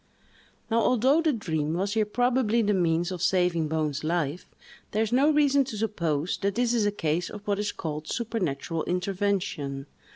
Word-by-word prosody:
Now, 230 - +3
although 255 +7 +3
the 320 -2 +2
dream 160 - -2
was 195 +3 -1
here 220 -2 +1
probably 240 0 +2
the 210 0 +2
means 175 -1 +1
of 180 -3 -5
saving 180 -4 +2
Bone's 155 -2 -1
life, 165 0 -1 0.5
there 215 +1 +2
is 220 - -3
no 270 +5 +4
reason 285 -2 +4
to 230 -4 -6
suppose 170 -7 -1
that 200 0 -1
this 245 0 +1
is 220 -3 +2
a - - +1
case 165 -3 -1
of 210 0 -9
what 200 -1 0
is 210 0 -1
called 155 -1 -5
supernatural 175 - -2
intervention. 180 -7 -2
195 Hz, 175 wpm, -27 LUFS, 165-225 Hz, 0.5 s, no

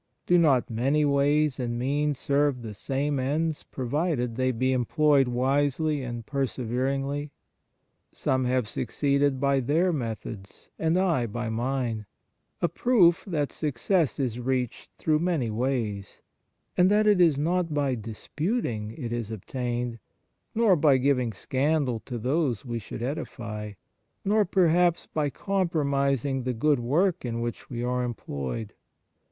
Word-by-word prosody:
Do 175 0 +4
not 140 -7 +4
many 135 +6 +1
ways 145 0 +2
and 120 -1 -2
means 145 +3 0
serve 140 -2 +1
the 110 -2 -6
same 140 +6 -1
ends 150 +4 -1
provided 130 -2 -2
they 130 +1 +1
be 130 +2 +1
employed 135 +2 +3
wisely 140 +4 +1
and 120 -3 -5
perseveringly? 135 +2 -2 0.8
Some 130 -1 0
have 125 -2 +1
succeeded 140 +3 0
by 140 0 +2
their 160 +8 +2
methods, 110 -6 -6
and 160 +2 +2
I 170 -10 +2
by 120 +2 -4
mine 120 -2 -2 0.6
a - - +5
proof 180 -7 +3
that 150 -6 -1
success 150 - 0
is 125 -3 -1
reached 125 -1 -2
through 155 -1 +1
many 160 -9 0
ways, 110 -4 -2 0.5
and 180 +1 +5
that 210 +1 +4
it 205 -3 +5
is 160 -5 +5
not 170 +3 0
by 145 -3 +1
disputing 115 - -3
it 120 -5 -4
is 120 -3 -3
obtained, 120 +2 -3 0.6
nor 220 -4 +5
by 145 -4 +4
giving 130 -3 +1
scandal 135 +3 0
to 125 - -5
those 130 0 0
we 120 -2 -3
should 115 +2 -7
edify, 115 -7 -5 0.5
nor, 210 +1 +3
perhaps, 175 -2 +3
by 150 -2 -1
compromising 140 - 0
the 125 0 -2
good 145 +4 +2
work 165 +10 +1
in 115 -2 -3
which 120 0 -5
we 120 -1 -4
are 125 0 0
employed. 105 - -4
135 Hz, 135 wpm, -27 LUFS, 120-155 Hz, 0.8 s, a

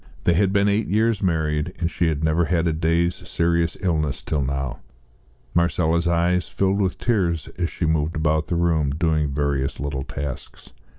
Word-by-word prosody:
They 85 - +3
had 95 +3 +2
been 100 0 +3
eight 105 +2 +1
years 110 0 +1
married, 80 -2 0
and 85 0 -1
she 85 - 0
had 80 -1 -1
never 80 +2 +2
had 85 0 +1
a 80 - +1
day's 85 +2 +1 0.2
serious 85 0 +1
illness 75 -7 -1
till 75 -2 -1
now. 70 -1 -3 0.7
Marcella's 85 0 +1
eyes 85 +1 +1
filled 100 +1 0
with 95 -2 0
tears 90 - 0
as 85 -1 0
she 85 - -3
moved 80 0 0
about 80 0 +1
the 85 - -1
room, 85 -4 +2
doing 80 0 0
various 70 -1 -1
little 70 -1 -3
tasks. 70 -2 -7
85 Hz, 175 wpm, -23 LUFS, 75-90 Hz, 0.7 s, They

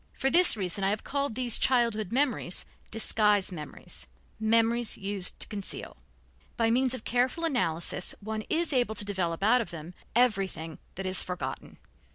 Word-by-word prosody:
For 270 0 0
this 355 -9 +7
reason 195 0 -1
I 195 - +2
have 210 +2 -2
called 280 -4 -2
these 245 -2 +1
childhood 230 -6 +1
memories 250 -8 0 0.2
"disguise 210 -3 +3
memories," 150 - -8 0.3
memories 230 +1 +2
used 195 -2 0
to - - +2
conceal; 200 -3 -5 0.6
by 225 -1 +2
means 255 +1 +2
of 240 - -9
careful 250 +7 0
analysis 180 - -1
one 215 +1 -4
is 330 -1 0
able 245 -4 +2
to 205 - -2
develop 185 -3 -2
out 240 +4 +4
of 230 - -6
them 165 +1 -9 0.2
everything 195 -9 0 0.2
that 190 - -5
is 185 0 +1
forgotten. 180 0 -5
215 Hz, 160 wpm, -28 LUFS, 190-245 Hz, 0.6 s, this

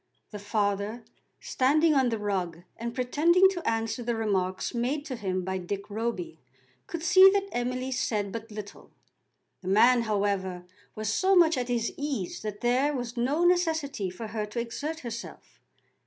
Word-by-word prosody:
The 210 - -6
father, 205 +2 -1 0.4
standing 305 +5 +2
on 265 -3 +3
the 225 - -1
rug 185 -5 -3
and 235 +1 -5
pretending 320 +9 +4
to 355 -3 -2
answer 225 +1 -2
the 235 0 -1
remarks 190 -4 -1
made 260 +5 -1
to 270 -5 -4
him 185 -5 -2
by 190 +1 -2
Dick 200 +3 -5
Roby, 235 - -3 0.5
could 335 -2 -5
see 375 +2 +8
that 395 0 0
Emily 255 +2 -2
said 210 -5 -1
but 225 +1 -6
little. 210 -1 -9 0.7
The 185 - -9
man, 235 +5 +5
however, 200 -4 -1 0.3
was 215 0 -2
so 385 - +3
much 335 -2 +5
at 250 -2 -2
his 235 -2 -1
ease 280 -11 -3
that 210 -1 -6
there 255 +4 +2
was 245 -2 -4
no 270 +8 +1
necessity 320 - +1
for 215 +5 -7
her 210 0 -3
to 210 +3 -4
exert 295 +7 -4
herself. 235 -1 -8
235 Hz, 165 wpm, -28 LUFS, 205-285 Hz, 0.7 s, see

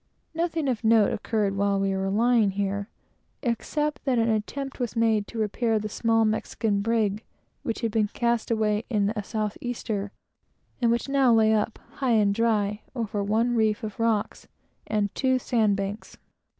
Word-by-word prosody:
Nothing 325 -2 -1
of 245 -3 -1
note 220 -2 +4
occurred 210 -2 -1
while 200 0 +1
we 195 0 0
were 190 0 -1
lying 225 +1 +3
here, 200 +1 -2 0.5
except 295 +4 -1
that 260 -3 +2
an 230 0 +2
attempt 270 +6 -3
was 245 -1 -2
made 225 -3 +2
to 235 - -9
repair 220 +1 0
the 215 0 -3
small 225 +1 +2
Mexican 215 -1 0
brig 215 -1 0 0.4
which 230 - -3
had 230 -2 -1
been 215 -1 +2
cast 235 +1 -1
away 215 -1 +1
in 210 -3 +1
a 215 -1 -3
south 215 -1 -3
easter, 215 -5 -3 0.7
and 235 - +3
which 235 +3 0
now 275 -2 +3
lay 220 -1 +5
up, 215 +1 0 0.2
high 260 -4 +2
and 205 -2 +3
dry, 210 -2 +1
over 215 -4 -2
one 225 +4 +1
reef 220 -2 +1
of 215 0 -6
rocks 225 -2 0 0.4
and 210 -2 0
two 260 -1 +2
sand 220 -5 +1
banks. 200 +2 -5
220 Hz, 170 wpm, -26 LUFS, 205-235 Hz, 0.7 s, lay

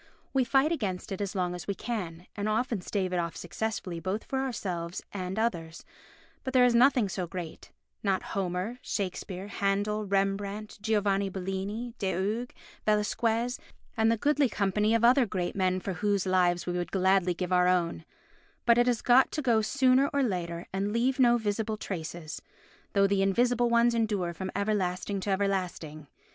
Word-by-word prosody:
We 265 -1 +3
fight 270 +5 +3
against 200 - -3
it 195 - -3
as 200 0 -3
long 180 -2 0
as 175 -1 -7
we 200 - -1
can, 180 -8 -5
and 205 +1 -2
often 225 -1 0
stave 185 -1 -2
it 180 - +1
off 170 -1 -2
successfully 180 -1 -4
both 190 +5 -3
for 265 - -3
ourselves 185 -10 -3
and 185 0 -4
others, 170 -8 -2 0.6
but 260 - -4
there 250 -1 +7
is 245 - +4
nothing 245 -2 +5
so 185 -2 -3
great—not 185 +2 -5
Homer, 190 +5 -3
Shakespeare, 190 -1 -4
Handel, 205 +1 0
Rembrandt, 200 +2 -1
Giovanni 200 -2 +1
Bellini, 195 +5 -4
De 190 -2 0
Hooghe, 215 +7 -2 0.3
Velasquez 225 +3 +1 0.4
and 220 0 +3
the 230 - +1
goodly 290 +1 +2
company 210 +2 +1
of 230 - +1
other 245 +1 +5
great 180 -2 -2
men 185 -1 +1
for 190 +1 -4
whose 200 +2 0
lives 180 -2 +2
we 175 - -2
would 175 0 -3
gladly 190 -1 +2
give 180 +1 -2
our 180 0 +4
own—but 185 - -1
it 240 - +4
has 240 -3 +1
got 255 +2 +5
to 305 - -1
go 230 -4 +3
sooner 260 +3 +3
or 280 -1 +1
later 175 -6 -2
and 195 +2 -1
leave 250 +4 +1
no 240 -2 +5
visible 215 0 -2
traces, 170 -5 -6 0.5
though 200 -1 +4
the 195 0 +2
invisible 240 +5 +2
ones 235 0 +4
endure 210 -7 0
from 190 +2 -5
everlasting 200 -1 -1
to 190 - -4
everlasting. 180 -6 -2
200 Hz, 170 wpm, -29 LUFS, 185-230 Hz, 0.6 s, there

